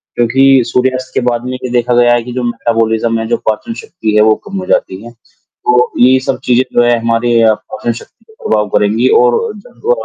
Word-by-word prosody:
क्योंकि 135 Hz, +2 st, +3 dB
सूर्यास्त 130 Hz, +1 st, -1 dB
के -, -, +1 dB
बाद 120 Hz, 0 st, -3 dB
में 125 Hz, -, -4 dB
ये 125 Hz, 0 st, -5 dB
देखा 120 Hz, 0 st, 0 dB
गया 120 Hz, 0 st, +4 dB
है 120 Hz, -1 st, 0 dB
कि 125 Hz, +1 st, -8 dB
जो 125 Hz, 0 st, -3 dB
मेटाबॉलिज़्म 115 Hz, -1 st, -1 dB
है, 115 Hz, -, -3 dB
जो 120 Hz, +1 st, 0 dB
पाचन 165 Hz, -, -3 dB
शक्ति 175 Hz, -, -4 dB
है 105 Hz, -, +5 dB
वो 110 Hz, 0 st, +4 dB
कम 200 Hz, -1 st, -5 dB
हो 185 Hz, -, -6 dB
जाती 95 Hz, -, -1 dB
हैं। 120 Hz, -, -11 dB, 0.5 s
तो 125 Hz, 0 st, +2 dB
ये 130 Hz, +2 st, +5 dB
सब 130 Hz, 0 st, -3 dB
चीज़ें 125 Hz, +1 st, +2 dB
जो 120 Hz, -, +4 dB
हैं 120 Hz, 0 st, +2 dB
हमारे 115 Hz, 0 st, +1 dB
अ, 110 Hz, -1 st, +4 dB
पाचन 120 Hz, +2 st, -5 dB
शक्ति 225 Hz, -, -14 dB
को -, -, -17 dB
प्रभाव 105 Hz, -1 st, +1 dB
करेंगी 105 Hz, +5 st, +1 dB
और 120 Hz, 0 st, +3 dB, 0.2 s
जब 240 Hz, +4 st, -18 dB
वो 475 Hz, -, +2 dB
120 Hz, 225 wpm, -13 LUFS, 115-130 Hz, 0.5 s, है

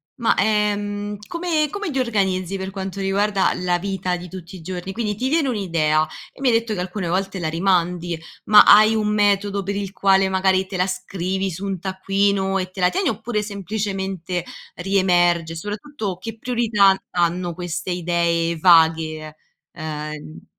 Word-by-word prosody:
ma, 235 Hz, -2 st, +1 dB
ehm, 205 Hz, -1 st, 0 dB
come 335 Hz, -3 st, 0 dB
come 405 Hz, +1 st, -4 dB
ti 270 Hz, -, -1 dB
organizzi 195 Hz, -6 st, 0 dB
per 190 Hz, 0 st, -5 dB
quanto 195 Hz, 0 st, -5 dB
riguarda 195 Hz, +1 st, +1 dB
la 180 Hz, -1 st, 0 dB
vita 190 Hz, -1 st, -2 dB
di 175 Hz, +1 st, -9 dB
tutti 185 Hz, +1 st, -9 dB
i -, -, -12 dB
giorni? 180 Hz, +2 st, -5 dB
Quindi: 210 Hz, 0 st, -2 dB
ti 255 Hz, +6 st, -2 dB
viene 310 Hz, -1 st, +2 dB
un'idea 165 Hz, -9 st, +1 dB, 0.3 s
e -, -, -16 dB
mi 265 Hz, -, +3 dB
hai -, -, +3 dB
detto 230 Hz, -1 st, 0 dB
che 180 Hz, -, -3 dB
alcune 180 Hz, 0 st, -4 dB
volte 190 Hz, +2 st, -1 dB
la 165 Hz, -, -2 dB
rimandi, 175 Hz, 0 st, 0 dB, 0.2 s
ma 210 Hz, -1 st, +8 dB
hai 215 Hz, +2 st, +7 dB
un 215 Hz, -1 st, 0 dB
metodo 205 Hz, -1 st, +1 dB
per 200 Hz, +2 st, -3 dB
il 195 Hz, -1 st, -4 dB
quale, 195 Hz, -1 st, +3 dB
magari 190 Hz, 0 st, +2 dB
te 190 Hz, -, -7 dB
la 180 Hz, +1 st, +1 dB
scrivi 185 Hz, +1 st, -3 dB
su 180 Hz, +4 st, -7 dB
un 195 Hz, -2 st, -3 dB
taccuino 195 Hz, +1 st, 0 dB
e 185 Hz, -1 st, -3 dB
te 185 Hz, 0 st, -8 dB
la 180 Hz, -, +5 dB
tieni, 385 Hz, -1 st, -1 dB
oppure 220 Hz, 0 st, -1 dB
semplicemente 195 Hz, -3 st, -3 dB, 0.3 s
riemerge? 175 Hz, -3 st, +2 dB
E -, -, -8 dB
soprattutto, 205 Hz, -, -5 dB
che 225 Hz, +4 st, -7 dB
priorità 220 Hz, -5 st, +3 dB
n 190 Hz, -, 0 dB
hanno 175 Hz, 0 st, 0 dB
queste 180 Hz, +1 st, -4 dB
idee 170 Hz, -1 st, 0 dB
vaghe, 160 Hz, -2 st, +3 dB, 0.3 s
ehm, 155 Hz, -2 st, -5 dB, 0.2 s
n -, -, -14 dB
190 Hz, 175 wpm, -21 LUFS, 175-205 Hz, 0.3 s, ma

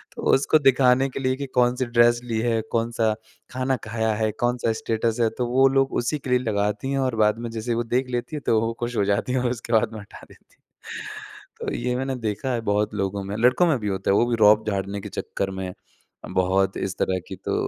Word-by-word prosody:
तो -, -, -7 dB
उसको 145 Hz, +3 st, +4 dB
दिखाने 135 Hz, -1 st, +4 dB
के 130 Hz, -, -6 dB
लिए 130 Hz, 0 st, +1 dB
कि 140 Hz, +1 st, -5 dB
कौन-सी 125 Hz, +1 st, +2 dB
ड्रेस 120 Hz, 0 st, +4 dB
ली 115 Hz, -2 st, -2 dB
है, 115 Hz, -1 st, +1 dB
कौन-सा 115 Hz, -1 st, +1 dB, 0.4 s
खाना 130 Hz, +1 st, 0 dB
खाया 110 Hz, 0 st, -1 dB
है, 110 Hz, 0 st, 0 dB
कौन-सा 120 Hz, -1 st, +1 dB
स्टेटस 115 Hz, +1 st, -1 dB
है, 115 Hz, -, +3 dB
तो 120 Hz, +2 st, -3 dB
वो 130 Hz, +2 st, +4 dB
लोग 135 Hz, 0 st, +1 dB
उसी 150 Hz, +5 st, -2 dB
के 135 Hz, -, -8 dB
लिए 125 Hz, 0 st, +4 dB
लगाती 105 Hz, +1 st, -1 dB
हैं 135 Hz, -, 0 dB
और 130 Hz, -3 st, 0 dB
बाद 105 Hz, +1 st, +2 dB
में 120 Hz, 0 st, -4 dB
जैसे 115 Hz, +1 st, -4 dB
ही -, -, +1 dB
वो 120 Hz, -, 0 dB
देख 130 Hz, 0 st, +1 dB
लेती 120 Hz, +5 st, -3 dB
हैं -, -, -6 dB
तो 110 Hz, -, +4 dB
वो 115 Hz, +1 st, -1 dB
खुश 120 Hz, 0 st, -3 dB
हो 100 Hz, -, +2 dB
जाती 100 Hz, +5 st, 0 dB
हैं 130 Hz, -, +2 dB
और 125 Hz, -, +1 dB
उसके 120 Hz, -1 st, -5 dB
बाद 110 Hz, 0 st, +2 dB
में 110 Hz, -, -6 dB
हटा 100 Hz, -, -13 dB
देती -, -, -21 dB
हैं। -, -, -10 dB
तो -, -, -4 dB
ये 125 Hz, +1 st, -1 dB
मैंने 135 Hz, +1 st, -2 dB
देखा 125 Hz, +5 st, -3 dB
है 120 Hz, -, -1 dB
बहुत 105 Hz, +1 st, 0 dB
लोगों 100 Hz, 0 st, -2 dB
में, 100 Hz, +1 st, -5 dB
लड़कों 125 Hz, +9 st, +4 dB
में 150 Hz, -6 st, +2 dB
भी 105 Hz, -, -4 dB
होता 95 Hz, -1 st, -1 dB
है, -, -, +4 dB
वो -, -, +4 dB
भी 120 Hz, -, +1 dB
रोब 110 Hz, +1 st, +5 dB
झाड़ने 100 Hz, 0 st, -3 dB
के -, -, -7 dB
चक्कर 95 Hz, -, -3 dB
में 95 Hz, -1 st, -4 dB, 0.6 s
बहुत 95 Hz, +1 st, +2 dB
इस 95 Hz, 0 st, -3 dB
तरह 95 Hz, 0 st, +1 dB
की 95 Hz, -, -6 dB
तो -, -, -1 dB
115 Hz, 245 wpm, -24 LUFS, 105-125 Hz, 0.6 s, रोब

